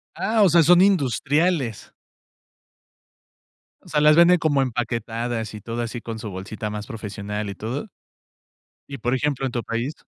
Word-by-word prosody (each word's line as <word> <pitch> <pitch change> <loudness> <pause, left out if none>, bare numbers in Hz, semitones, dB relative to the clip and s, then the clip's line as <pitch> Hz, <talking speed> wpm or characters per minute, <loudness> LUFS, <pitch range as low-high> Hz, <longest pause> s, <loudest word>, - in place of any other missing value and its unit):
Ah, 220 +1 +1
o 195 - +6
sea, 170 0 +5
son 175 +3 +6
industriales. 145 - +1 1.9
O - - -16
sea, 150 - +1
¿las 150 0 +6
venden 170 +2 +6
como 145 -4 +2
empaquetadas 115 -2 -3
y 105 - -7
todo 115 +2 -4
así, 115 +1 -5
con 115 -1 -7
su 110 - -6
bolsita 105 +3 -6
más 105 0 -6
profesional 105 -1 -5
y 100 - -8
todo? 130 - -5 1.0
Y, 140 - -6
por 120 +3 -1
ejemplo, 135 0 -1
¿en 130 - -4
tu 120 -2 -2
país? 120 +6 -3
120 Hz, 160 wpm, -23 LUFS, 110-150 Hz, 1.9 s, o